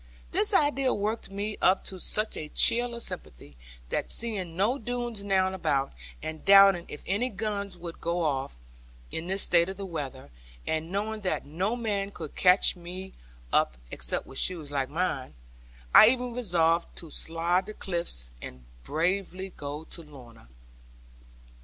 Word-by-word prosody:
This 215 - +3
idea 275 -3 +2
worked 210 +2 -2
me 205 +2 -4
up 185 +1 +4
to 190 - -8
such 215 +4 0
a 155 - -5
chill 240 +6 +3
of 235 - -5
sympathy, 70 +4 -7 0.3
that - - -2
seeing 195 -8 0
no 225 +8 +2
Doones 240 -2 -3
now 190 -1 +2
about, 150 - 0 0.3
and 155 0 -6
doubting 195 -3 +7
if 150 - -9
any 210 +7 0
guns 200 -2 -3
would 170 -1 -9
go 170 +1 0
off, 135 - -1 0.5
in 165 +2 -4
this 190 +1 +2
state 170 +1 +4
of 190 - -5
the 200 - -5
weather, 140 - -6 0.3
and 160 +2 -2
knowing 215 +2 -2
that 185 - -1
no 185 +10 -1
man 205 -4 -2
could 160 -6 -8
catch 185 +2 +5
me 180 +2 -8 0.4
up 60 - +3
(except - - -2
with 135 - -4
shoes 160 -6 +1
like 135 -2 -1
mine), 145 - -2 0.6
I 215 - +10
even 250 0 +1
resolved 170 -8 +1
to 165 -3 -9
slide 170 +3 0
the 215 - -7
cliffs, 170 - -3
and 65 0 -9 0.2
bravely 185 +4 -1
go 145 +2 -6
to 170 - -9
Lorna. 125 - -14
185 Hz, 160 wpm, -28 LUFS, 160-205 Hz, 0.6 s, I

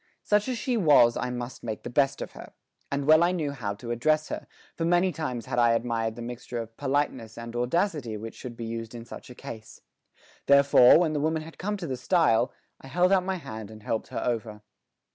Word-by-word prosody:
Such 210 +2 +2
as 255 -2 -1
she 240 +2 -1
was 145 - +5
I 125 - -2
must 125 0 -5
make 110 -2 -5
the - - -5
best 135 +2 +1
of - - -9
her, - - -12 0.4
and 140 0 -1
well 155 +2 +6
I 175 - +3
knew 160 -6 -1
how 110 -7 -4
to 120 +3 -7
address 155 +6 +1
her, - - -5 0.3
for 165 - -4
many 175 +2 +3
times 140 -7 -4
had 125 -1 -1
I 120 -1 +5
admired 115 -1 -1
the 120 - -7
mixture 120 0 -6
of 115 -1 -6
politeness 135 -5 -2
and 115 0 -7
audacity 125 - 0
which 110 +2 -7
should 120 -2 -9
be 115 - -5
used 115 0 -5
in 115 -1 -8
such - - -10
a 125 - -10
case. 110 -2 -10 0.7
Therefore, 140 -2 +7
when 165 -2 +2
the 150 - 0
woman 160 +1 0
had 165 +1 -13
come 205 +2 -2
to 185 - -6
the 130 -5 -3
stile, 130 -4 +2 0.3
I - - -12
held 175 +7 +2
out 190 -2 +4
my 190 +1 -1
hand 110 - -7
and 110 -1 -12
helped 110 - -2
her - - -4
over. 110 -3 -3
125 Hz, 225 wpm, -27 LUFS, 115-160 Hz, 0.7 s, Therefore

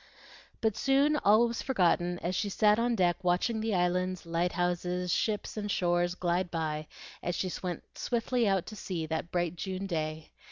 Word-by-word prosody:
But 220 -2 +1
soon 275 +3 +3
all 215 0 +5
was 235 0 -3
forgotten 175 -7 +2
as 175 - -1
she 205 - 0
sat 210 +2 +3
on 235 0 +2
deck 175 -4 +2
watching 180 +6 +1
the 220 -2 0
islands, 180 0 0
lighthouses, 175 +1 0
ships, 215 0 -1
and 210 -1 -3
shores 175 -1 +1
glide 175 0 0
by 155 -2 -2 0.3
as 175 - -2
she 185 +1 -2
went 180 -3 -4
swiftly 240 -1 0
out 195 -3 +2
to 215 - -8
sea 180 -5 -4
that 160 +1 -3
bright 175 -1 0
June 190 +2 -4
day. 155 -3 -3
180 Hz, 170 wpm, -30 LUFS, 175-210 Hz, 0.3 s, all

